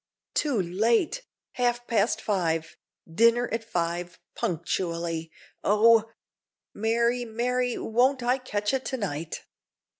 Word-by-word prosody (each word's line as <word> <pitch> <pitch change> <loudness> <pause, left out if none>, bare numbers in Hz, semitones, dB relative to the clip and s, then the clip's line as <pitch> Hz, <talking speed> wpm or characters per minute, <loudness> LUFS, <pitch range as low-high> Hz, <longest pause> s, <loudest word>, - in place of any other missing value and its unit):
"Too 280 -8 +1
late! 225 - +1 0.3
half 240 -1 0
past 220 -1 +1
five; 165 -6 -1 0.3
dinner 230 +8 +3
at 225 0 -2
five 175 -3 -3 0.2
punctually! 165 -1 -2 0.3
Oh! 225 +2 +5 0.6
Mary, 235 +3 +1
Mary, 245 +2 -1
won't 250 +3 +2
I 250 +2 +2
catch 210 -3 -2
it 265 -1 0
to 260 - -2
night!" 165 - -4
225 Hz, 110 wpm, -27 LUFS, 175-245 Hz, 0.6 s, Oh